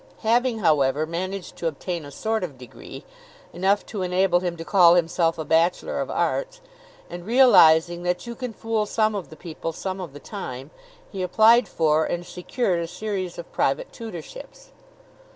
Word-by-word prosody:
Having, 240 +2 +2
however, 150 -6 +2
managed 185 +3 -5
to 170 - -2
obtain 165 +1 -4
a - - -9
sort 220 +7 -2
of 150 -7 -6
degree, 125 -1 -11 0.5
enough 195 +3 +1
to 210 -3 -6
enable 180 0 +2
him 175 -1 -3
to 165 - -7
call 175 -3 +6
himself 165 -1 +1
a 160 - -4
Bachelor 170 - +1
of - - -4
Arts, - - -1 0.5
and 175 0 -8
realizing 175 -8 +5
that 180 +4 -2
you 235 - -6
can 250 0 -6
fool 220 -1 -2
some 215 0 +1
of 200 -4 -5
the 155 - -11
people 165 0 -6
some 190 +3 -5
of 170 -6 -8
the 145 - -10
time, 135 - -7 0.4
he 195 - -5
applied 220 +5 +5
for 155 -2 +2
and 175 0 -3
secured 180 +2 -2
a 170 - -3
series 185 0 -4
of 170 - -9
private - - -1
tutorships. 245 - -10
180 Hz, 170 wpm, -24 LUFS, 165-220 Hz, 0.5 s, call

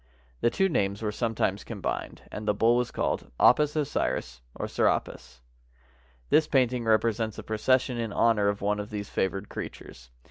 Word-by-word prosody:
The - - +3
two 195 +10 +2
names 100 - -1
were 105 - 0
sometimes 115 0 -1
combined, - - -5
and 105 0 -6
the 105 - +2
bull 115 +3 +4
was 125 0 +1
called - - -2
Apis 150 +4 +5
Osiris 135 - -2
or - - -4
Serapis. 60 0 -1 0.9
This 155 -1 +5
painting 125 -3 +1
represents 110 0 +1
a - - -6
procession 125 +3 +1
in 115 -2 -2
honor 110 -1 +3
of 100 0 -1
one 105 +1 +1
of 105 +1 -5
these 105 -1 -6
favored 95 +2 -1
creatures. - - -8
110 Hz, 165 wpm, -27 LUFS, 100-125 Hz, 0.9 s, Apis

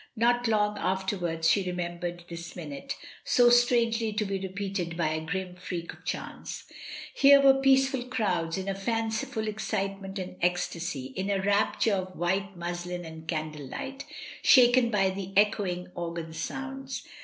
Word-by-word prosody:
Not 240 +1 +3
long 210 -1 +2
afterwards 185 -4 0
she 195 +4 +4
remem 175 -1 -3
bered 175 0 -5
this 170 0 -8
minute, 150 -5 -6 0.3
so 240 -1 +5
strangely 235 -2 +3
to 210 0 0
be 195 -1 -2
repeated 190 -3 -3
by 165 -3 +1
a 155 0 -1
grim 180 +2 -3
freak 175 -1 -5
of - - -18
chance. - - -5 0.5
Here 280 0 +7
were 270 -1 +6
peaceful 270 -1 +4
crowds 185 -10 0
in 190 0 -4
a 195 - 0
fanciful 225 +3 -2
excitement 195 -2 -3
and 185 -1 -5
ecstasy, 170 -6 -1
in 190 +1 -2
a 200 -1 +1
rapture 205 +2 +2
of 185 -1 -2
white 190 +3 -1
muslin 175 0 -4
and 160 0 -10
candlelight, 155 - -4 0.4
shaken 245 -2 +6
by 195 -3 +2
the 195 0 -6
echoing 195 -4 +2
organ 170 -1 -5
sounds. 270 +9 -5
195 Hz, 150 wpm, -28 LUFS, 175-225 Hz, 0.5 s, Here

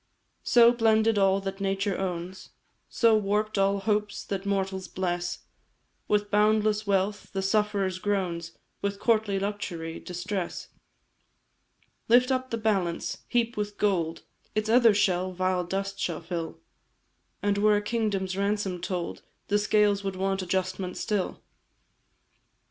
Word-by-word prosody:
"So, 235 -1 +6
blended 225 -2 +3
all 195 0 +4
that 195 0 -5
nature 195 0 0
owns, 185 0 -4 0.4
So, 230 -2 +4
warp'd 210 0 0
all 195 +1 +3
hopes 210 0 -1
that 195 0 -4
mortals 190 -1 -1
bless 175 -1 -3 0.7
With 205 0 +1
boundless 210 0 +2
wealth, 200 +1 0
the 195 -1 -1
sufferer's 200 -2 +1
groans; 180 -5 -2 0.2
With 200 0 -2
courtly 215 -4 +2
luxury, 180 -5 -4
distress. 180 +1 -4 1.4
"Lift 250 +3 +5
up 260 0 -1
the 230 - -2
balance 195 -6 -1
heap 235 -1 0
with 205 -1 -3
gold, 170 -6 0 0.3
Its 215 0 0
other 230 -2 +6
shell 185 -2 +1
vile 185 0 0
dust 195 +2 -3
shall 170 -2 -2
fill; 170 - -5 0.9
And 200 0 +1
were 210 0 +4
a - - -1
kingdom's 205 -4 -1
ransom 200 -2 -1
told, 180 -1 -3 0.3
The 205 - +3
scales 205 -1 +2
would 195 -1 -3
want 195 +1 -1
adjustment 185 0 -2
still. 205 -3 -2
200 Hz, 130 wpm, -27 LUFS, 185-210 Hz, 1.4 s, So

